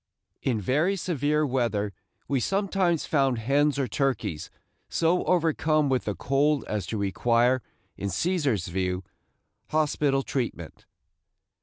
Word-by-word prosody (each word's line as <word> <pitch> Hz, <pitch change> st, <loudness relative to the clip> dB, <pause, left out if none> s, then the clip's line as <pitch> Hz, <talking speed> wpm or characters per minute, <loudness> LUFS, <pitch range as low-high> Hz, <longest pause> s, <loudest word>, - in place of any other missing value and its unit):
In 120 Hz, -5 st, 0 dB
very 150 Hz, -, +1 dB
severe 150 Hz, -4 st, 0 dB
weather 115 Hz, -6 st, 0 dB, 0.3 s
we 140 Hz, -2 st, +1 dB
sometimes 190 Hz, -, +1 dB
found 135 Hz, -5 st, +2 dB
hens 140 Hz, +5 st, +2 dB
or 135 Hz, -2 st, 0 dB
turkeys 110 Hz, -, -1 dB, 0.4 s
so 170 Hz, +2 st, +2 dB
overcome 155 Hz, -3 st, +2 dB
with 130 Hz, -2 st, 0 dB
the 105 Hz, -, -2 dB
cold 140 Hz, +2 st, +1 dB
as 105 Hz, -4 st, -3 dB
to 110 Hz, -, -3 dB
require, 120 Hz, +5 st, +2 dB, 0.4 s
in 100 Hz, -, -3 dB
Cæsar's 140 Hz, -, 0 dB
view, 90 Hz, +1 st, -2 dB, 0.7 s
hospital 145 Hz, -3 st, +1 dB
treatment. 115 Hz, -, -4 dB
135 Hz, 120 wpm, -26 LUFS, 110-155 Hz, 0.7 s, found